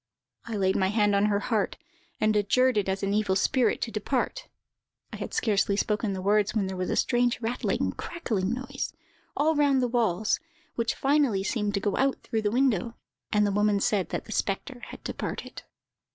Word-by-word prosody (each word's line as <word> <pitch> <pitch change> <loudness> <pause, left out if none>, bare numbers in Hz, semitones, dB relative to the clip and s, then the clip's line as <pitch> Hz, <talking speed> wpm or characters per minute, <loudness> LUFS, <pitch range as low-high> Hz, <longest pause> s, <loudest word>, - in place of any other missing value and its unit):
I 230 - -4
laid 190 -2 +1
my 190 - +2
hand 205 0 +2
on 200 +1 +3
her 200 -1 +1
head, 210 -1 -1 0.4
and 215 0 +2
adjured 255 +5 +3
it 205 -2 +1
as 190 +1 -2
an 195 0 0
evil 205 -2 +1
spirit 245 +6 +2
to 230 - -4
depart. 260 - -2 0.7
I - - -4
had - - -5
scarcely 200 -2 +1
spoken 210 -1 0
the 185 -1 -5
words 205 +2 +2
when 210 -3 +1
there 190 0 -4
was 185 0 -2
a - - 0
strange 245 -1 +2
rattling, 235 +1 -1
crackling 215 - -3
noise, 255 +2 -4 0.5
all 310 +2 +3
round 285 -2 +3
the 250 - +2
walls, 220 -4 +1 0.3
which 230 0 -1
finally 275 -8 +2
seemed 210 -1 -1
to - - +1
go 200 0 -1
out 270 0 +2
through 225 - -1
the 210 - +1
window; 235 -2 +1 0.4
and 210 -1 +3
the 205 - +1
woman 205 0 +2
said 195 -2 +1
that - - -4
the - - -10
spectre 230 +6 -2
had - - -11
departed. - - -5
215 Hz, 195 wpm, -27 LUFS, 200-245 Hz, 0.7 s, on